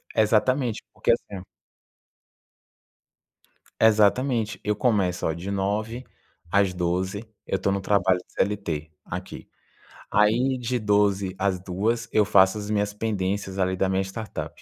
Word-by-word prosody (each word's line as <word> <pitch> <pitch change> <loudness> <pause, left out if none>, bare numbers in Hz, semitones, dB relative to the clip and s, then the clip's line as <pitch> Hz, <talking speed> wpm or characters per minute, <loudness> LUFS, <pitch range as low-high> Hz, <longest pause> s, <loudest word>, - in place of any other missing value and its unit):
exatamente 115 +2 +2
porque - - +1
assim 100 -5 -2 2.4
Exatamente. 110 +1 +3
Eu 105 0 0
começo, 100 -6 +1
olha, 80 - 0
de 95 +4 -6
9 105 +5 -2 0.5
às 100 -2 +3
12, 90 +4 -2 0.2
eu - - 0
estou 95 +1 0
no 100 - 0
trabalho 95 -2 +2
CLT 85 -7 -2
aqui. - - -7 0.6
Aí, 120 +5 +3
de 125 +1 -2
12 100 -3 +1
às 95 -1 +1
14h, 110 +6 -2
eu 105 - +3
faço 95 0 +4
as 105 0 -6
minhas 105 -1 0
pendências 100 -2 -2
ali 95 0 +1
da 95 - +1
minha 95 0 +1
startup. 105 +3 -7
100 Hz, 125 wpm, -25 LUFS, 95-110 Hz, 2.4 s, faço